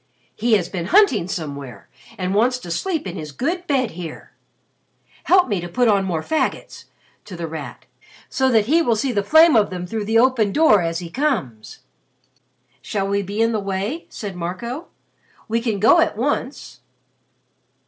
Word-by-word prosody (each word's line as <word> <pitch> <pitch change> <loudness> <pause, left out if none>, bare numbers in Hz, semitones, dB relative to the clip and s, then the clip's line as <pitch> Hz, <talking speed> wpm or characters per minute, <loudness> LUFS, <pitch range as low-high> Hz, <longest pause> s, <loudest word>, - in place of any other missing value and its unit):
He 230 +1 0
has 190 -5 +2
been 175 -3 -5
hunting 400 - +4
somewhere 140 - -6 0.3
and 185 -1 -2
wants 240 +5 +2
to 175 -9 -9
sleep 320 - -2
in 185 - -5
his 155 -2 -7
good 345 - -3
bed 260 -5 +1
here. 165 -2 -9 0.9
Help 370 -3 +4
me 200 -7 -1
to 175 - -6
put 245 +6 +1
on 200 -3 +3
more 165 -4 -2
faggots," 315 - -2 0.4
to 185 - -9
The 170 - -4
Rat, 155 -3 -8 0.4
"so 265 0 +1
that 220 -4 +3
he 320 +8 +3
will 240 -8 +2
see 255 +4 -1
the 205 -4 0
flame 315 +7 +6
of 210 -2 +3
them 180 -2 -5
through 215 +3 -4
the 225 +2 +2
open 235 -4 +3
door 215 - +4
as 165 -1 -2
he 170 -1 -7
comes." 185 - -3 1.0
"Shall 195 -2 -2
we 200 0 0
be 200 +3 -1
in 230 - +2
the 220 - -1
way?" 200 - -4
said 200 -4 -7
Marco. 210 - -5 0.6
"We 230 +1 0
can 225 -4 -2
go 220 +3 +5
at - - +1
once." 270 +2 -3
210 Hz, 180 wpm, -21 LUFS, 180-255 Hz, 1.0 s, flame